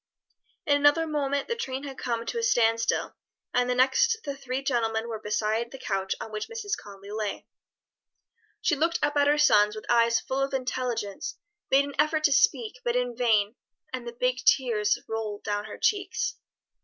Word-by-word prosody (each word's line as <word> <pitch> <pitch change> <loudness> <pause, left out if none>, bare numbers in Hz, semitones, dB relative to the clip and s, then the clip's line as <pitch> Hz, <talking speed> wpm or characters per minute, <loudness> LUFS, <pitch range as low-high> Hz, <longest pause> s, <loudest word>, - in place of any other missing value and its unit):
In 285 -1 +4
another 290 +3 +4
moment 285 -2 -1
the 470 - -1
train 265 - -4
had 275 -2 -7
come 235 -2 -2
to 465 - -3
a - - -1
stand 230 - +3
still, 225 - -1 0.4
and 250 0 +2
the 250 - +1
next 455 - +3
the 280 -1 -4
three 270 0 -4
gentlemen 230 -4 0
were 225 -2 -4
beside 215 +2 -1
the 270 - -9
couch 195 -6 -2
on 225 - -7
which 215 0 -4
Mrs. 440 -3 -3
Conly 200 - -12
lay. 215 -1 -3 1.2
She 330 - +2
looked 330 +4 +1
up 290 0 +1
at 285 0 +4
her 295 +1 +4
sons 210 -8 +5
with 215 - -8
eyes 235 -1 +4
full 265 +1 -3
of 275 0 -1
intelligence, 250 -6 -3 0.3
made 275 +1 +4
an 285 - -7
effort 310 +1 +2
to 290 - +4
speak, 255 -3 +2
but 240 0 0
in 245 -1 0
vain; 225 -2 +2 0.4
and 250 -2 -5
the 235 - -5
big 250 0 +1
tears 225 -6 +3
rolled 220 -2 -4
down 205 0 -2
her 215 - -8
cheeks. 425 +2 0
250 Hz, 190 wpm, -27 LUFS, 220-285 Hz, 1.2 s, sons